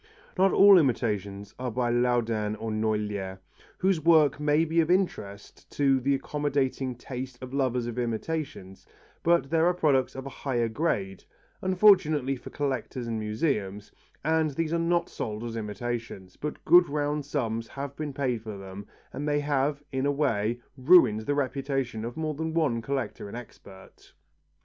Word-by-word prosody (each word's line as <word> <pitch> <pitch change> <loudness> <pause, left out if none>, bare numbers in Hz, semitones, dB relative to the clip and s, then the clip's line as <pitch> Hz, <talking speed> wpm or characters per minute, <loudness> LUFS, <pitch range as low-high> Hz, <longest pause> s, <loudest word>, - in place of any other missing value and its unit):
Not 190 +1 +4
all 200 -2 +8
imitations 105 - -1
are 125 0 -2
by 120 +1 -1
Laudin 115 -3 +1
or 110 +1 -5
Noailher, 105 -3 -2 0.4
whose 185 -3 +1
work 155 -3 +4
may 150 +2 +2
be 165 +1 +2
of 160 - -1
interest 135 - -2
to 135 -2 +3
the 140 +2 +1
accommodating 135 -2 -1
taste 125 +1 -7
of 130 0 -9
lovers 130 -3 0
of 120 +1 -4
imitations, 120 -4 -4 0.3
but 170 -4 +2
there 165 0 +3
are 180 - +2
products 135 -7 +2
of 135 0 -6
a - - -5
higher 120 -4 0
grade, 105 - -2 0.4
unfortunately 180 -8 +4
for 125 - -10
collectors 130 -3 -3
and 115 -1 -3
museums, 105 -3 -2 0.3
and 160 0 +2
these 160 +3 -2
are 170 - +1
not 170 +1 +1
sold 110 0 -5
as 115 -1 -5
imitations, 110 -3 -5
but 150 0 -6
good 175 +2 +6
round 145 0 -1
sums 115 -5 -2
have 140 0 -6
been 150 -1 -4
paid 130 -4 -1
for 110 -2 -7
them 95 +1 -9 0.3
and 145 +2 -4
they 145 0 +2
have, 145 0 0
in 135 +1 0
a - - +2
way, 120 -5 0 0.2
ruined 130 -6 +5
the 145 - +1
reputation 135 -4 -2
of 120 +1 -6
more 155 -1 -2
than 160 +2 -4
one 140 -9 +1
collector 130 -3 -3
and 100 - -7
expert. 100 -5 -14
130 Hz, 165 wpm, -27 LUFS, 115-150 Hz, 0.4 s, all